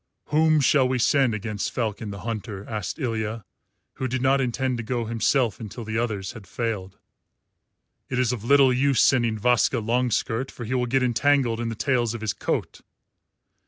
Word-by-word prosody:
"Whom 155 0 +4
shall 135 -1 +4
we 130 0 0
send 130 -1 +3
against 105 -2 -3
Falcon 110 -2 -3
the 100 -2 -7
Hunter?" 105 -2 -5
asked 105 -4 -4
Ilya, 115 -5 -3 0.5
who 130 - -2
did 130 +1 -2
not 135 +1 +3
intend 130 0 -1
to 120 - -4
go 120 0 -2
himself 115 0 +1
until 110 +1 -7
the 110 +1 -2
others 105 -5 -2
had 110 -6 -12
failed. 105 -5 -4 1.1
"It 125 - -2
is 125 -1 +2
of 115 -4 -5
little 135 +1 +5
use 135 +1 +2
sending 120 -4 +3
Vaska 125 +3 +2
Longskirt, 120 +1 0
for 120 - -8
he 120 - -3
will 125 -1 0
get 130 +2 +1
entangled 125 -1 +2
in 120 -1 -2
the 115 - -4
tails 120 -2 0
of 115 - -7
his 110 -2 -1
coat. - - -3
120 Hz, 180 wpm, -24 LUFS, 110-130 Hz, 1.1 s, little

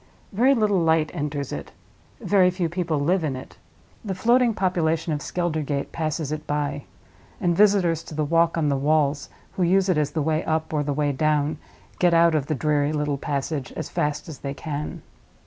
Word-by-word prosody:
Very 255 +7 +4
little 210 -5 +2
light 160 -2 +2
enters 145 -2 -3
it; - - -6 0.5
very 190 -3 +4
few 180 -2 -2
people 170 -2 -1
live 170 +5 +1
in 145 -4 -1
it; 130 - -10 0.4
the 195 -4 -3
floating 240 +5 +3
population 170 -5 0
of 145 - -3
Skeldergate 155 -5 -2
passes 155 -2 -2
it 155 0 -5
by; 145 -1 -2 0.5
and 175 -1 +1
visitors 190 -5 +3
to 155 - -9
the 155 0 0
Walk 165 +2 +2
on 155 -2 +1
the 140 - +1
Walls, 145 0 +1 0.2
who - - -5
use 190 +2 +3
it 170 -4 +3
as 150 -1 +1
the 155 0 -2
way 155 +1 0
up 160 0 -1
or 150 - +1
the 145 0 -2
way 145 0 0
down, 150 +1 0 0.4
get 175 -2 +4
out 165 0 +5
of 145 -3 0
the 155 - 0
dreary 150 0 +1
little 150 -2 -1
passage 140 -1 -3
as - - -5
fast 150 0 -2
as 155 -5 -8
they 140 0 -5
can. 150 0 -5
155 Hz, 195 wpm, -24 LUFS, 145-175 Hz, 0.5 s, out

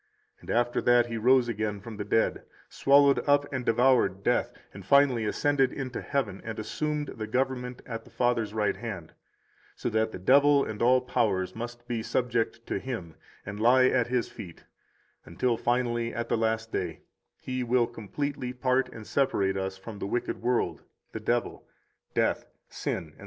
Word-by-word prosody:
And - - -15
after 120 +1 +1
that 120 -1 +4
He 115 -1 -4
rose 125 +2 +4
again 105 -2 -2
from 110 +1 -9
the 105 - -3
dead, 110 +2 +1 0.3
swallowed 140 0 +4
up 145 0 +4
and 130 -1 -2
devoured 115 -5 +3
death, - - +1 0.2
and 100 - -10
finally 130 0 +4
ascended 135 +3 +2
into 130 -3 -5
heaven 135 -9 -2
and 110 -1 -6
assumed 150 +7 -2
the 110 -1 -6
government 125 +1 -2
at 115 -2 -6
the - - -17
Father's 120 -3 0
right 105 -1 0
hand, 100 -9 -7 0.6
so - - -3
that 110 0 +1
the - - -6
devil 140 +8 +5
and 105 -1 -6
all 125 +2 +5
powers 100 -7 0
must 120 +1 -7
be 120 -2 -2
subject 115 -1 -1
to - - -2
Him 110 -11 -6 0.3
and 105 +1 -6
lie 130 +3 +5
at 125 -3 +1
His 125 -1 0
feet, 85 -4 -11 0.6
until 115 +9 0
finally, 120 0 0
at 120 - -3
the - - +2
last 110 0 -1
day, - - -3 0.4
He 130 -1 -3
will 120 0 +3
completely 125 +4 -4
part 130 0 +1
and 110 -3 -10
separate 100 -9 +1
us 95 0 -3
from 105 +2 -9
the - - -3
wicked 120 +3 -2
world, 120 +1 0 0.3
the - - -5
devil, - - -2 0.5
death, - - +1 0.2
sin, 80 - -4
etc. 75 - -24
120 Hz, 175 wpm, -28 LUFS, 110-130 Hz, 0.6 s, devil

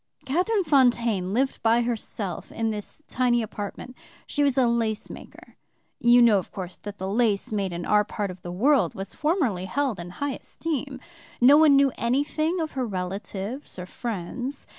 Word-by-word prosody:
"Catherine 370 +9 +1
Fontaine 240 - +2
lived 265 +5 0
by 230 +1 +3
herself 215 -6 -4
in 225 -1 -1
this 210 +8 -7
tiny 245 -2 +1
apartment. 215 +4 -7 0.3
She 290 - -2
was 280 -2 +2
a 260 - +5
lace 230 -2 -1
maker. - - -13 0.4
You 240 0 +6
know, 215 -4 +5
of 185 - -9
course, 185 -2 -6
that 205 -1 -8
the 190 - -4
lace 215 0 +1
made 200 -3 -1
in 175 0 -5
our 210 0 +4
part 205 -1 -4
of 180 0 -12
the 175 - -6
world 225 - +2
was 195 +1 -6
formerly 290 - 0
held 260 +1 -1
in 170 0 -7
high 285 -1 -1
esteem. 280 -3 -5 0.4
No 260 +4 +7
one 300 -2 +6
knew 275 -1 +4
anything 300 +8 0
of 315 - -3
her 255 -3 -2
relatives 195 +6 -5
or 180 - -5
friends. 240 +6 -5
235 Hz, 175 wpm, -25 LUFS, 200-275 Hz, 0.4 s, No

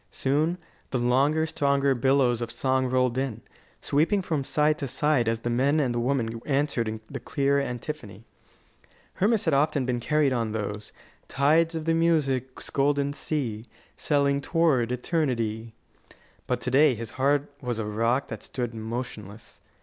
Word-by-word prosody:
Soon 150 +6 0 0.3
the 130 - -1
longer, 135 +6 +2
stronger 140 -3 +1
billows 130 -1 +2
of 120 - -3
song 130 +2 0
rolled 125 0 +1
in, 125 -4 -3 0.4
sweeping 165 +8 +1
from 155 -6 -1
side 150 +2 +1
to 140 - -3
side 140 -2 +1
as 115 0 -2
the 120 - -2
men 140 +6 +2
and 130 -5 +1
the 120 - -1
women 120 -3 -1
answered 140 -5 0
in 110 0 -4
the 135 - -6
clear 140 +2 +1
antiphony. 120 -5 -6 0.9
Hermas 215 +2 +1
had 160 - +2
often 140 -1 +2
been 125 -1 -1
carried 145 +2 +2
on 115 -3 -1
those 105 -1 -4 0.4
Tides 160 +4 +2
of 160 0 -4
music's 150 -6 0
golden 140 0 +1
sea 120 -8 -3 0.3
Selling 140 -1 +1
toward 145 -8 +2
eternity. 115 -6 -2 0.7
But 125 -1 -1
to 125 - -3
day 140 0 +5
his 115 0 -7
heart 140 +2 +1
was 125 -3 -3
a 110 - -2
rock 115 +5 0
that - - -6
stood 120 -2 -4
motionless. 110 -2 -7
135 Hz, 155 wpm, -26 LUFS, 120-145 Hz, 0.9 s, day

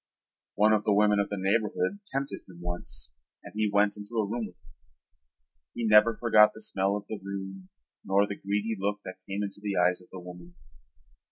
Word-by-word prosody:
One 110 +1 +5
of 105 -1 +2
the 105 -2 +3
women 105 0 +4
of 100 - 0
the 100 - -3
neighborhood 105 - 0
tempted 135 +1 -3
him 85 -2 -13
once 85 -9 -5 0.3
and - - -11
he 110 -1 +1
went 100 0 +3
into 105 +3 -9
a 110 -2 +2
room 115 +1 -2
with 90 - -16
her. 70 - -23 1.0
He 120 - -2
never 105 +1 +6
forgot 105 -2 +5
the 110 - -9
smell 95 +1 +1
of 105 0 -5
the 110 - -5
room 95 -1 -6 0.3
nor 100 +1 +3
the 100 - -5
greedy 105 +3 -1
look 105 +1 -1
that 95 0 -9
came 100 +1 -2
into 100 0 -6
the 100 -2 -2
eyes 90 +1 +3
of 90 - -18
the 95 - -7
woman. 90 -1 -11
100 Hz, 200 wpm, -28 LUFS, 95-105 Hz, 1.0 s, never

